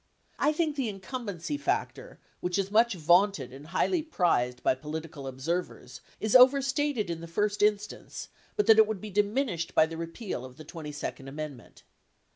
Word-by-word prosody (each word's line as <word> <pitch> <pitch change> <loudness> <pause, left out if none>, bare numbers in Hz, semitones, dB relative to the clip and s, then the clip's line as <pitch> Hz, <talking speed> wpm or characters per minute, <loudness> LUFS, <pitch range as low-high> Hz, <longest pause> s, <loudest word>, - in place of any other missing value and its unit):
I 295 - +3
think 310 -1 0
the 255 -5 0
incumbency 200 - -5
factor - - -2 0.2
which 180 +1 -1
is 195 0 -1
much 225 0 +4
vaunted 175 -5 +3
and 140 +3 -11
highly 315 - +1
prized 145 - 0
by - - +4
political 150 +1 -7
observers 160 +8 -4 0.2
is 215 +1 0
overstated 265 - +4
in 165 -1 -5
the 170 - -7
first 205 +4 -1
instance, 210 0 -1 0.3
but 420 - +2
that 220 0 +7
it 220 - +7
would 215 -3 -3
be 215 +2 -8
diminished 205 -3 0
by - - +6
the 165 0 -7
repeal 165 - -5
of 130 0 -11
the 155 - -11
22d 150 -3 -6
amendment. 145 -1 -8
190 Hz, 165 wpm, -29 LUFS, 155-230 Hz, 0.3 s, that